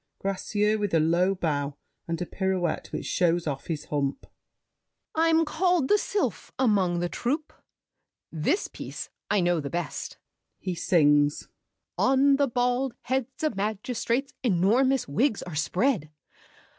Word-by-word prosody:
GRACIEUX 210 +2 0
(with 205 -4 0
a - - +5
low 175 +5 +2
bow 145 -5 -2 0.3
and 165 -1 -2
a 180 - -2
pirouette 185 -2 -1
which - - -4
shows 175 -1 +1
off 140 -3 -4
his 155 -3 -3
hump). 140 -2 -2 0.9
I'm 325 0 +3
called 340 -2 +1
the 415 - +5
Sylph 405 0 -2
Among 195 -8 +2
the 175 - 0
troupe. 290 - -2 0.8
This 165 - 0
piece - - -7 0.2
I 205 - +3
know 175 -1 +2
the 140 -2 -4
best. 170 -2 -4 0.4
[He 185 - -3
sings. 145 -4 +3 0.5
"On 275 +1 +4
the 280 0 +3
bald 245 +1 0
heads 260 +2 -2
of 310 - 0
magistrates, 230 +6 -1
Enormous 245 +6 +2
wigs 220 - +1
are 175 - -8
spread. 180 - 0
195 Hz, 135 wpm, -27 LUFS, 170-265 Hz, 0.9 s, a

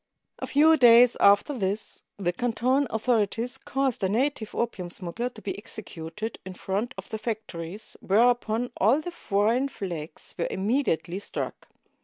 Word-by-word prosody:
A - - -4
few 315 +3 +5
days 240 -1 +7
after 205 +8 +5
this, 205 -3 -3 0.2
the 175 -3 -1
Canton 245 +6 +1
authorities 230 +2 0
caused 270 -6 -1
a 190 - +2
native 235 0 -1
opium 200 -7 -2
smuggler 185 +7 -3
to 220 -4 -14
be 195 - -3
executed 205 0 -7
in 185 0 -8
front 205 +8 -3
of - - -8
the 220 - -4
factories, 210 -4 -5
whereupon 235 +2 +2
all 230 +9 +4
the 350 +3 -6
foreign 230 -2 +1
flags 170 - -7
were 170 - +1
immedi 230 +9 0
ately 175 +4 -7
struck. - - -5
220 Hz, 150 wpm, -26 LUFS, 195-245 Hz, 0.2 s, days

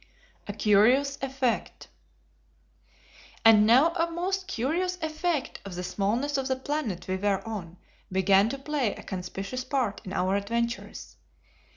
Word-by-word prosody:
A 205 - -4
Curious 235 +8 +3
Effect. 265 -3 -2 1.6
And 215 -2 +7
now 270 +9 +5
a 335 -1 0
most 370 +3 -2
curious 360 +5 -1
effect 315 -2 -2
of 195 -3 -8
the 180 - -4
smallness 220 +10 -1
of 265 - -2
the 260 - +1
planet 260 - -3
we 185 0 -1
were 200 +2 -1
on 185 -6 -6 0.3
began 195 +2 +4
to 275 - -4
play 275 -5 -1
a - - -11
conspicuous 195 +6 -5
part 255 -6 -1
in 185 - -8
our 190 0 0
adventures. 235 +4 -3
235 Hz, 140 wpm, -27 LUFS, 200-285 Hz, 1.6 s, And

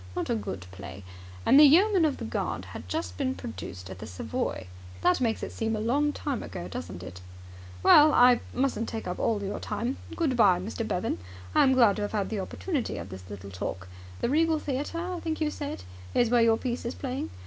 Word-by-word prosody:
Not - - -2
a - - +2
good 100 -3 -4
play. 95 0 -9 0.4
And 275 - +7
the - - +10
Yeoman 360 +5 +6
of 295 - 0
the - - -5
Guard - - -3
had - - -9
just 320 0 -3
been 265 -1 0
produced 95 - -7
at 95 0 -9
the - - -7
Savoy. 95 0 -3 0.4
That 180 - +3
makes 225 -3 0
it - - -4
seem 225 0 -1
a - - -3
long 280 +7 +2
time 285 -4 -3
ago, 85 - -6
doesn't 85 0 -7
it? 90 0 -9 0.6
Well, 300 +1 +8
I 245 -2 +6
mustn't 255 -3 0
take 225 - -5
up 180 - -4
all 215 -3 0
your 195 - -3
time. 235 +5 -3 0.2
Good 300 -6 +1
bye, 195 -6 +5
Mr. 220 +4 -4
Bevan. 180 - -1 0.3
I - - +5
am 265 - +5
glad 235 -6 +5
to - - -2
have 205 - -3
had 205 -3 0
the 215 - -1
opportunity 275 - -3
of - - -6
this 95 -1 -10
little 100 -1 -8
talk. 95 0 -5 0.3
The - - +1
Regal 320 +3 +3
Theatre, 290 +2 -3
I 355 +1 -3
think 320 -1 -3
you 305 -1 0
said, 285 - -5 0.3
is 240 -1 +3
where 240 -1 +5
your 225 -1 +4
piece 245 0 -3
is 235 - -4
playing? 265 0 -4
230 Hz, 220 wpm, -28 LUFS, 180-285 Hz, 0.6 s, the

